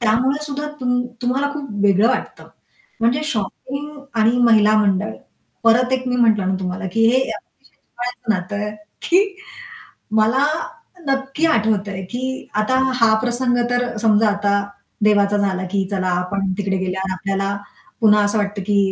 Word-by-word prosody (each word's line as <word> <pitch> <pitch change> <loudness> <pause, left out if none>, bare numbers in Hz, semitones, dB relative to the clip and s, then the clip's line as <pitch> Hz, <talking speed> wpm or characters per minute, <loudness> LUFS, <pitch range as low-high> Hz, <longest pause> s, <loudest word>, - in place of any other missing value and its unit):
त्यामुळे 255 +6 +1
सुद्धा 295 0 -4
तुम 245 -1 +1 0.2
तुम्हाला 265 +3 +1
खूप 285 -2 -6
वेगळं 200 +2 +4
वाटतं. 255 - -3 0.5
म्हणजे 240 +5 +2
शॉपिंग 275 +3 -4 0.3
आणि 230 +3 +3
महिला 215 -2 +5
मंडळ 205 0 +1 0.5
परत 245 +3 +4
एक 255 0 0
मी 250 - 0
म्हटलं 220 -5 +3
ना 190 - +1
तुम्हाला 185 +2 -3
की 225 - 0
हे 245 - +3
अतिशय - - -7
जिव्हाळ्याचं 245 -2 -4
नातं 185 +3 -4
आहे 210 - -3 0.3
की 385 +2 +2 0.8
मला 250 +6 +3 0.6
नक्की 270 +3 0
आठवतंय 210 -8 +1
की 260 +2 -4
आता 260 +5 +1 0.2
हा 220 -1 +6
प्रसंग 245 0 0
तर 245 -1 -1
समजा 215 -1 +4
आता 205 0 0 0.5
देवाचा 205 -1 +3
झाला 190 -2 0
की 195 -1 0
चला 190 -2 -1
आपण 195 +1 -2
तिकडे 195 -2 -1
गेल्यावर 190 0 -2
आपल्याला 195 +1 -2 0.5
पुन्हा 210 -1 +5
असं 205 +1 0
वाटतं 205 0 -2
की 205 -1 +2
220 Hz, 150 wpm, -20 LUFS, 200-255 Hz, 0.8 s, हा